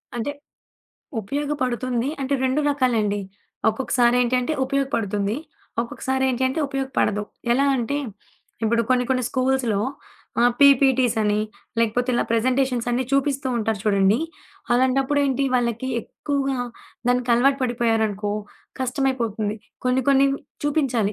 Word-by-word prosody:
అంటే, 240 +4 -2 0.9
ఉపయోగపడుతుంది. 255 -1 -1
అంటే 270 +1 0
2 260 +3 +2
రకాలండి. 230 -7 +1 0.5
ఒక్కొక్కసారేంటి 245 +1 +2
అంటే 250 +5 -2
ఉపయోగపడుతుంది. 225 -7 -1 0.4
ఒక్కొక్కసారేంటి 260 +1 -1
అంటే 265 +5 -2
ఉపయోగపడదు. 270 -6 0 0.3
ఎలా 275 +3 +3
అంటే 245 +3 -1 0.7
ఇప్పుడు 230 +1 +2
కొన్ని 250 -1 +2
కొన్ని 255 -1 +2
స్కూల్స్‌లో 255 -5 +1 0.6
ఆహ్, 240 +1 +5
పీపీటీసని, 255 -6 +4 0.4
లేకపోతే 230 +2 +1
ఇలా - - +2
ప్రెజెంటేషన్స్ 250 +1 +1
అన్నీ 245 +2 0
చూపిస్తూ 275 0 +1
ఉంటారు 220 -2 -1
చూడండి. 200 +1 +3 0.5
అలాంటప్పుడేంటి 270 +2 +2
వాళ్ళకి 240 0 0
ఎక్కువగా 275 +2 -2 0.5
దానికలవాటు 250 +2 +3
పడిపోయారనుకో 225 -4 0 0.5
కష్టమైపోతుంది. 245 -5 -1 0.3
కొన్ని 255 +1 +2
కొన్ని 275 0 +5 0.4
చూపించాలి. 255 -8 +1
250 Hz, 100 wpm, -23 LUFS, 230-270 Hz, 0.9 s, ఆహ్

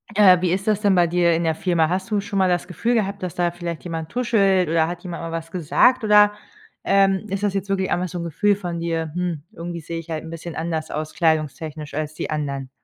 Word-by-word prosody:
Äh, 185 -4 +6
wie 180 -2 +1
ist 190 +2 -1
das 215 -1 +1
denn 200 -2 +3
bei 175 -1 +4
dir 170 0 +3
in 165 +1 0
der 160 -1 +1
Firma? 165 -2 +1
Hast 190 +3 -2
du 210 -2 +1
schon 200 0 -3
mal 190 - +4
das 175 -1 0
Gefühl 210 +7 -1
gehabt, 200 -3 -1
dass 180 -2 -4
da 175 -1 +1
vielleicht 170 -1 -6
jemand 165 -2 -5
tuschelt 195 -7 +2
oder 160 -1 +2
hat 175 0 -6
jemand 175 -2 -6
mal 165 - -5
was 165 0 -5
gesagt, 185 - +3
oder, 210 -1 +6 0.5
ähm, 195 0 +3
ist 195 +1 -3
das 205 -2 +1
jetzt 195 0 -2
wirklich 190 -1 0
einfach 180 +1 0
so 180 - -6
'n - - -3
Gefühl 205 +5 +1
von 175 -4 -5
dir, 165 -2 -2
hm, 175 -4 -3
irgendwie 170 -3 -6
sehe 165 +1 -5
ich 165 0 -11
halt 160 -1 -3
'n 160 - -9
bisschen 165 0 -7
anders 160 -1 -3
aus 155 +1 -4
kleidungstechnisch, 155 -2 -1
als 155 0 -3
die - - -5
anderen. 140 -3 -3
175 Hz, 250 wpm, -22 LUFS, 160-195 Hz, 0.5 s, Äh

